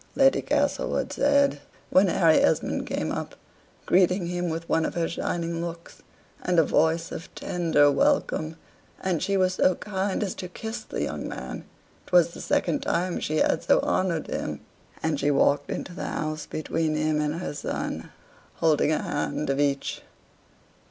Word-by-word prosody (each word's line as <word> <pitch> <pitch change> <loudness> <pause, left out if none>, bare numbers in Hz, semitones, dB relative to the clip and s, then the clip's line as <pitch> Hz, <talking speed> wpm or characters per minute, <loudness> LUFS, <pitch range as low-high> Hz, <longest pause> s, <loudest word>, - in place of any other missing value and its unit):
Lady 270 -1 +4
Castlewood - - 0
said, 280 - +3 0.3
when 190 +1 +5
Harry 165 -3 +4
Esmond - - +1
came - - -2
up, - - -4 0.5
greeting 180 0 +3
him 175 0 -2
with 165 +1 -4
one 165 - +2
of - - -2
her 170 -1 +1
shining 170 0 -2
looks, 170 0 -8 0.4
and 180 -1 0
a 165 - +7
voice 160 +3 +1
of 165 - -7
tender 160 -5 +2
welcome; 165 - +1 0.5
and 180 -4 0
she 200 0 +1
was 185 -1 +2
so 185 0 +3
kind 195 0 -2
as 195 - -2
to 180 - -6
kiss 220 +5 -6
the - - -4
young - - -4
man - - -6 0.4
('twas 175 -2 +5
the - - -8
second 290 0 0
time 180 -8 -1
she 155 - -2
had - - +2
so - - +4
honored 170 -4 0
him), - - -4 0.4
and 155 -3 0
she 145 - +1
walked 140 0 +2
into 180 - -4
the - - -5
house 155 -1 -3
between 155 0 -1
him 155 0 +1
and 150 +1 -1
her 170 - -4
son, 145 - -4 0.5
holding 155 -2 +2
a 155 - 0
hand 145 0 -2
of 135 - -1
each. 140 -1 0
170 Hz, 165 wpm, -26 LUFS, 155-185 Hz, 0.5 s, a